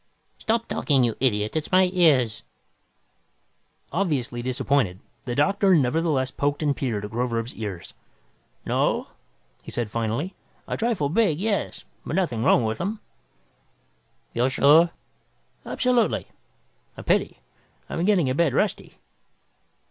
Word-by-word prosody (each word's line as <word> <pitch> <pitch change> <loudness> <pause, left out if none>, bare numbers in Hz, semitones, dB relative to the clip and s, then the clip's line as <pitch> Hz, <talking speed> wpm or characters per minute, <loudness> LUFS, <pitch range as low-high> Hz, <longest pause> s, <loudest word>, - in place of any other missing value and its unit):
"Stop 230 +1 0
talking, 135 -4 +1
you 115 -2 0
idiot, 110 -3 0
it's 155 -1 -3
my 185 0 +5
ears!" 140 - +3 1.5
Obviously 140 -10 -1
disappointed, 125 -6 0 0.3
the 120 -2 -3
doctor 195 +5 +3
nevertheless 145 -2 +1
poked 145 +2 -1
and 145 -2 +1
peered 115 -5 -2
at 105 - -8
Groverzb's 115 0 -2
ears. 100 -6 -7 0.7
"No," - - 0 0.5
he - - -11
said 115 -4 -3
finally. 115 - -2 0.3
"A - - -2
trifle 220 -11 0
big, 175 -3 +2
yes. 205 0 -2 0.2
But - - -4
nothing 145 -12 0
wrong 120 - +4
with 110 0 -2
them." 205 +5 -3 1.3
"You're 120 +2 +1
sure?" 150 +6 +5 0.8
"Absolutely. 245 -3 +1 0.7
A - - -8
pity. - - +1 0.5
I'm 165 - -3
getting 185 -6 +3
a 130 - +1
bit 150 -1 +2
rusty." - - -1
140 Hz, 125 wpm, -24 LUFS, 120-180 Hz, 1.5 s, my